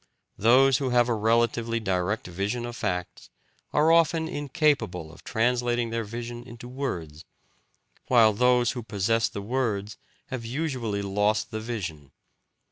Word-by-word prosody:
Those 130 +4 +5
who 135 -2 -1
have 120 0 +3
a - - +2
relatively 115 +1 +1
direct 95 0 -1
vision 100 +7 -3
of 120 0 -6
facts 90 -6 -4 0.4
are 155 +2 +4
often 165 -1 +3
incapable 145 - 0
of - - -16
translating 120 0 0
their 115 0 -1
vision 120 +2 -6
into 120 -1 -11
words, 85 - -5 0.8
while 115 -4 +5
those 125 +2 +3
who 125 - -5
possess 115 +1 0
the 100 - -6
words 110 -3 -2 0.3
have 130 -4 -4
usually 120 -5 -2
lost 105 +2 0
the 110 - -3
vision. 85 - -5
115 Hz, 135 wpm, -26 LUFS, 105-125 Hz, 0.8 s, Those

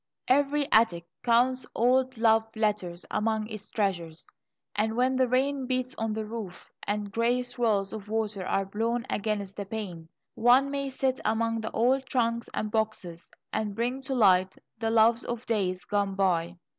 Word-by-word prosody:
Every 285 +2 +2
attic 180 -7 +4 0.2
counts 250 +2 +3
old 255 +1 +2
love 225 -1 +4
letters 205 -5 -1
among 215 0 0
its 215 -2 -7
treasures, 175 -6 -2 0.5
and 220 +2 0
when 255 +2 +2
the 255 0 +3
rain 265 +1 0
beats 255 0 -1
on 225 -1 -2
the 220 0 -3
roof 210 -5 -8 0.2
and 205 0 -2
grey 235 +4 +1
swirls 225 -5 0
of 210 -1 -7
water 215 -3 -2
are 195 +1 0
blown 230 +4 -1
against 205 -2 -2
the 200 - -4
pane, 180 -7 -6 0.2
one 250 +4 +4
may 275 -1 -2
sit 265 0 -1
among 225 +1 0
the 220 - -3
old 260 +3 +1
trunks 235 -2 0
and 215 - -3
boxes 210 -6 -3 0.2
and 210 -2 -2
bring 245 +4 -1
to 265 0 -3
light 190 -5 +4 0.2
the 225 -1 0
loves 225 +1 +4
of 240 0 -5
days 185 -5 -1
gone 200 -1 0
by. 175 -3 +1
225 Hz, 165 wpm, -28 LUFS, 200-245 Hz, 0.5 s, attic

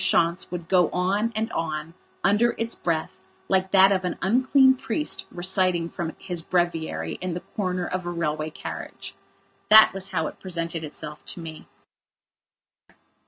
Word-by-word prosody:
Schontz 170 0 +2
would 175 -2 -6
go 180 -3 +4
on 200 +5 0
and 220 +1 -1
on 160 0 -3 0.3
under 210 +6 +3
its 230 0 -2
breath 165 0 -2 0.4
like 190 0 +2
that 195 0 +6
of 190 -1 +1
an 180 -2 -2
unclean 260 +5 +5
priest 265 +4 -3
reciting 180 -1 +1
from 170 -3 -4
his 175 -3 -3
breviary 165 - -1
in 180 -2 -3
the 175 - -4
corner 185 -3 -1
of 185 -1 -3
a - - -1
railway 155 -2 -2
carriage. 155 - -7 0.6
That 215 0 +9
was 195 0 -2
how 160 -4 -1
it - - -7
presented 170 -3 -4
itself 150 0 -6
to - - -6
me. 160 -2 -9
180 Hz, 155 wpm, -25 LUFS, 165-195 Hz, 0.6 s, That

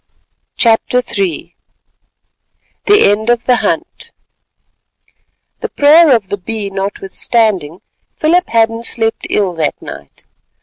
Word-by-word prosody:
CHAPTER 230 +1 +2 0.2
III 190 -6 -3 1.3
THE 410 - +5
END 215 +3 -1
OF 240 -1 +1
THE 250 -1 +3
HUNT - - -3 1.5
The - - -4
prayer 295 0 +5
of 205 -5 -3
the 205 - -2
Bee 205 +1 -5
notwithstanding, 195 -2 -1 0.3
Philip 345 +4 +1
Hadden 225 0 +1
slept 225 -1 -2
ill 195 -4 0
that 160 -3 -2
night. - - -11
225 Hz, 105 wpm, -14 LUFS, 195-240 Hz, 1.5 s, THE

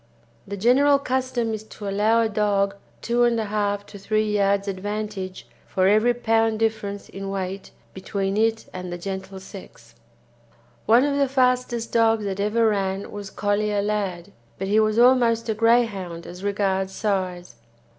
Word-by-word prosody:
The 200 +1 -5
general 270 +7 +4
custom 255 -4 -1
is 215 0 -5
to 210 -1 -9
allow 210 +4 +2
a - - +2
dog 205 -2 +1 0.3
2 235 +1 -1
1/2 210 -4 +1
to 200 - -12
3 215 +1 0
yards 200 0 +1
advantage 200 -1 -4 0.2
for 185 -1 +1
every 215 +4 +4
pound 225 -2 +1
difference 215 -2 -2
in 195 0 -7
weight 195 0 -4 0.2
between 195 +1 -3
it 225 +1 +1
and 180 -1 -6
the 175 - -4
gentle 190 +1 -6
sex. 190 +1 -13 0.9
One 235 +3 +6
of 285 0 0
the 275 -2 +2
fastest 250 -3 +1
dogs 225 -1 +3
that 195 -1 -3
ever 220 +3 +2
ran 195 -2 -1
was 205 -1 -7
Collier 205 0 0
Lad, 200 -3 -2 0.3
but 195 - -3
he 210 +2 +3
was 215 0 +2
almost 235 -2 +4
a - - +2
Greyhound 215 -7 +1
as 180 +2 -10
regards 195 -1 0
size. 185 - -2
210 Hz, 155 wpm, -23 LUFS, 195-225 Hz, 0.9 s, One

